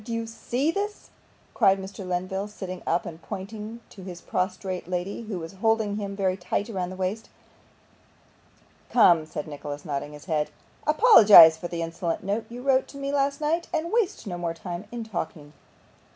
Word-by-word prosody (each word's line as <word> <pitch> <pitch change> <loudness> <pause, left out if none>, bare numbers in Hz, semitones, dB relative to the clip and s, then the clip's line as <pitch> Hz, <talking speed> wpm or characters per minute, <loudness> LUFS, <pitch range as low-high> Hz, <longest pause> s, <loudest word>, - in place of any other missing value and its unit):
Do 230 - -8
you 230 0 -2
see 245 +6 -1
THIS?' 415 +3 -4 0.4
cried 195 0 +4
Mr. 195 +1 -8
Lenville, 185 +2 -2
sitting 185 -3 -7
up, 170 +1 +1
and 165 0 -8
pointing 215 +4 -7
to 195 - -12
his 180 -2 -8
prostrate 185 0 -3
lady, 180 +4 -3
who 205 -4 -3
was 165 0 -7
holding 220 -2 +2
him 200 -1 -4
very 190 -2 +1
tight 205 +2 -2
round 185 -4 -3
the - - -7
waist. 190 +4 -3 1.6
'Come,' 170 -9 +5
said 150 -1 -5
Nicholas, 145 -1 -7
nodding 145 0 -4
his 150 -1 -12
head, 155 -4 0 0.4
'apologise 215 - +9
for 165 +2 -6
the 170 -1 -3
insolent 165 +1 -3
note 210 +3 -2
you 245 +1 -8
wrote 265 -1 +3
to 280 - -11
me 275 0 -3
last 280 0 +1
night, 330 +3 0
and 330 +3 -2
waste 430 - 0
no 175 -4 -5
more 170 -1 -2
time 175 +3 -6
in 240 -1 -4
talking. 160 -8 -6
195 Hz, 180 wpm, -26 LUFS, 175-230 Hz, 1.6 s, apologise